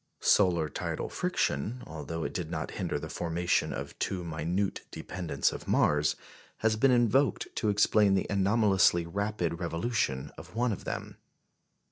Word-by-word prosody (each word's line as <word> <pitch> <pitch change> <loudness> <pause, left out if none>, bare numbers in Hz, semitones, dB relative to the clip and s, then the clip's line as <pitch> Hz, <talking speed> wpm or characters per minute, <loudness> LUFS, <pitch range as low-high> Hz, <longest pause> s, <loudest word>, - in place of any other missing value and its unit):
Solar 85 -6 +4
tidal 70 - -4
friction, 110 - -1
although 80 +1 -5
it - - -3
did 85 -3 -3
not 80 -2 -4
hinder - - -2
the 75 +2 -6
formation 85 +2 0
of - - -6
two 90 -2 -2
minute 85 +4 -2
dependents 80 -7 -2
of - - -8
Mars, 75 0 +3 0.5
has 110 -1 +4
been 135 +5 +4
invoked 120 0 +3
to 110 - +1
explain 105 -1 +4
the 95 - +1
anomalously 100 -3 +3
rapid 95 -2 -2
revolution 85 - -1
of 85 +5 -13
one 120 +1 +1
of 100 - -5
them. - - -5
90 Hz, 145 wpm, -29 LUFS, 80-105 Hz, 0.5 s, Solar